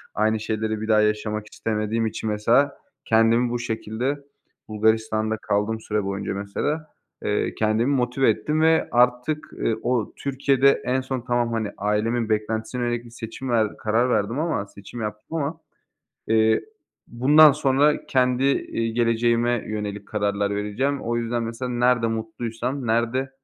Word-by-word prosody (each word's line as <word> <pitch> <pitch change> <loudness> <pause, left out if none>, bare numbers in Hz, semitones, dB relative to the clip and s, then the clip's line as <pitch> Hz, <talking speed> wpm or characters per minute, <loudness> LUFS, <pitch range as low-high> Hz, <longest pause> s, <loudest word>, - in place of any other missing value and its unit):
Aynı 110 +1 +2
şeyleri 110 0 -2
bir 110 - -4
daha 110 -1 +4
yaşamak 105 0 -1
hiç - - -17
istemediğim 110 +1 -1
için 110 0 -3
mesela 120 +7 +2 0.3
kendimi 115 +2 +3
bu 120 0 -2
şekilde, 120 +4 -3 0.5
Bulgaristan'da 110 0 +1
kaldım 105 +1 -1
süre 105 -1 -1
boyunca 100 0 -3
mesela, 125 +11 -3 0.4
eee, - - 0
kendimi 110 +4 +1
motive 125 +1 +2
ettim 150 +9 0
ve 160 0 +4
artık, 125 +5 +1
ııı, 115 - -1
o 120 -4 0
Türkiye'de 140 0 +2
en 130 +1 +1
son 130 -1 -4
tamam, 120 -1 0
hani, 110 -2 -2
ailemin 110 +3 0
beklentisine 110 +3 -1
yönelik 120 0 -2
bir - - -12
seçim 115 +3 -7
ver 110 -3 +1
karar 115 +4 +1
verdim 115 +3 0
ama 160 -10 -1
seçim 100 +4 -10
yaptım 105 +8 -5
ama, 160 +2 -2 0.7
eee, 110 0 +3 0.4
bundan 145 +5 +6
sonra 145 +1 +2
kendi, 125 0 +2
eee, 125 -4 0
geleceğime 120 0 +1
yönelik 105 -1 -4
kararlar 100 -1 0
vereceğim. 125 +8 -1
O 120 +1 -1
yüzden 120 0 -1
mesela 115 +2 -4
nerede 125 -1 +2
mutluysam, 115 +3 -3
nerede, 120 +4 0
115 Hz, 145 wpm, -24 LUFS, 110-125 Hz, 0.7 s, bundan